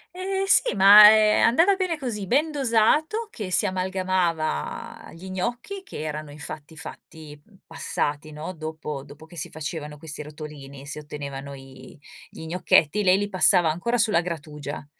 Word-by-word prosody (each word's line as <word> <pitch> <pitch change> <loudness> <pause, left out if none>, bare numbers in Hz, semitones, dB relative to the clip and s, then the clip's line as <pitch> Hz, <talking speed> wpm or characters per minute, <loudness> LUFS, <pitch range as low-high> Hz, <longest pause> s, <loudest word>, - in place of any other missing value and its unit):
Eh 385 +1 -2
sì, 375 - +3
ma 200 +2 +9
è 215 0 +5
andata 330 +12 +4
bene 360 -4 -1
così, 220 -8 -5
ben 300 - +1
dosato 295 - +1
che 210 -5 -6
si 175 - +2
amalgamava 185 - -2
gli 185 +3 -10
gnocchi 240 - -4
che 270 - -8
erano 155 -1 -5
infatti 150 +1 -9
fatti 155 -2 -11 0.2
passati, 155 -2 -3
no, 155 +4 -6
dopo 155 -3 -6
dopo 145 +3 -14
che 170 +1 -15
si 150 - -5
facevano 150 -1 -6
questi 155 -1 -8
rotolini, 145 -2 -10
si 150 +1 -6
ottenevano 140 -2 -8
i 135 +1 -13 0.3
gli 160 - -10
gnocchetti, 175 +2 +2
lei 185 0 +4
li 205 0 -2
passava 180 -3 +4
ancora 235 +9 -2
sulla 215 -6 +2
grattugia. 150 -4 -6
165 Hz, 150 wpm, -24 LUFS, 150-215 Hz, 0.3 s, ma